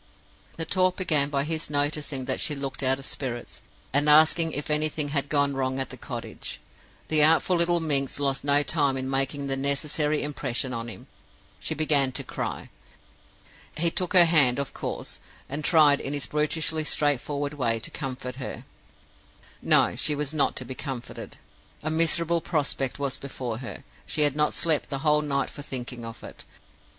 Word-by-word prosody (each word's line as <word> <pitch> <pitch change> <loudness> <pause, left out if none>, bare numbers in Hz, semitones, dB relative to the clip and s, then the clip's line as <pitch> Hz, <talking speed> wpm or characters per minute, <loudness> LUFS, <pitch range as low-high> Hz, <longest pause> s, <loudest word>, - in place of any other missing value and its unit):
"The 165 - -1
talk 185 +2 +2
began 155 -7 +2
by 140 -1 0
his 160 +1 -2
noticing 145 -2 -1
that - - -1
she 150 - 0
looked 135 -1 -4
out 130 0 +2
of 135 - -5
spirits, 120 -4 -5 0.3
and 145 +2 +2
asking 160 +2 +5
if 145 +1 -4
anything 150 -1 0
had 140 -1 -1
gone 145 -1 +2
wrong 130 -1 -2
at 135 -1 -3
the - - -8
cottage. - - -6 0.5
The 155 -1 +3
artful 165 +4 +4
little 170 0 +3
minx 140 -4 0
lost 135 -1 -1
no 145 +1 +4
time 145 -4 +1
in 130 0 -3
making 135 +1 -1
the 135 -1 -1
necessary 145 +2 0
impression 135 -3 -2
on 115 0 -4
him; 115 - -9 0.5
she - - -2
began 145 -3 +2
to - - -2
cry. - - -5 1.1
He 170 +1 +1
took 180 +1 -2
her 180 -2 +9
hand, 145 -7 +4
of 140 -1 -4
course, - - -4 0.3
and 145 +3 -4
tried, 150 -3 +5
in 140 - -2
his 145 -1 -1
brutishly 155 +1 0
straightforward 145 -1 0
way, 115 -6 0
to - - -5
comfort 125 -2 -5
her. 135 - -7 1.0
No; - - +4
she 150 - +1
was 145 0 -1
not 150 -3 +2
to 130 - -4
be 130 - -6
comforted. 130 -2 -7 0.5
A 155 - -1
miserable 165 +1 +3
prospect 140 -5 -1
was 140 -2 -2
before 125 -4 -5
her; 130 +2 -8 0.2
she 155 - -1
had 145 -1 +3
not 150 0 +1
slept 160 -3 +1
the 135 +2 -4
whole 150 0 +4
night 140 -2 -1
for - - -9
thinking 125 -3 -6
of 115 0 -9
it. - - -11
145 Hz, 180 wpm, -26 LUFS, 135-155 Hz, 1.1 s, her